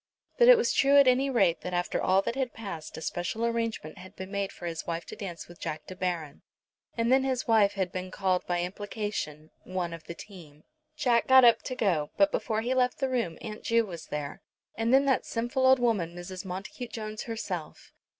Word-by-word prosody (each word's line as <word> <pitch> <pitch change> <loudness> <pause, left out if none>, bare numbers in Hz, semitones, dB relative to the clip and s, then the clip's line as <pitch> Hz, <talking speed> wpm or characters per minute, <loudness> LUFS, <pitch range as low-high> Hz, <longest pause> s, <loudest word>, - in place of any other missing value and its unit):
But 480 - +7
it - - +10
was 465 - +1
true 280 +1 +5
at 280 -2 +7
any 260 +2 +4
rate 205 -10 +2
that 180 0 -4
after 175 0 -1
all 190 +1 +3
that - - -2
had 260 -2 -2
passed 195 -8 -7
a - - -7
special 175 +8 -2
arrangement 230 -8 -2
had 185 - -12
been 190 +1 -8
made 200 -1 -2
for 175 - -10
his 165 -2 -4
wife 170 0 -3
to - - -8
dance 180 -6 -7
with 175 0 -14
Jack 155 - -5
De 185 - -9
Baron. 175 -6 -3 0.6
And 230 +1 +1
then 265 0 +5
his 260 -2 -1
wife 215 -3 +4
had 190 -3 -2
been 185 0 -5
called 185 -1 0
by 175 -1 0
implication, 190 -5 -4
"One 180 -2 -3
of 165 -1 -9
the 170 - -7
team." 160 -8 -13 0.3
Jack 240 -5 +2
got 260 -1 +8
up 235 - +6
to 255 - -5
go, 175 -11 +1
but 295 0 +4
before 220 -1 -1
he 245 +3 0
left 250 -1 +2
the 270 -2 -1
room 230 -11 -1
Aunt 215 -1 -7
Ju 230 0 +2
was 170 -5 -8
there, 150 -1 -5 0.3
and 225 +1 0
then 270 +2 +5
that 265 -2 +2
sinful 240 +3 0
old 260 0 +7
woman 210 -9 0
Mrs. 180 +2 -7
Montacute 195 +6 -6
Jones 215 -1 -5
herself. 195 -8 -6
205 Hz, 220 wpm, -28 LUFS, 175-240 Hz, 0.6 s, it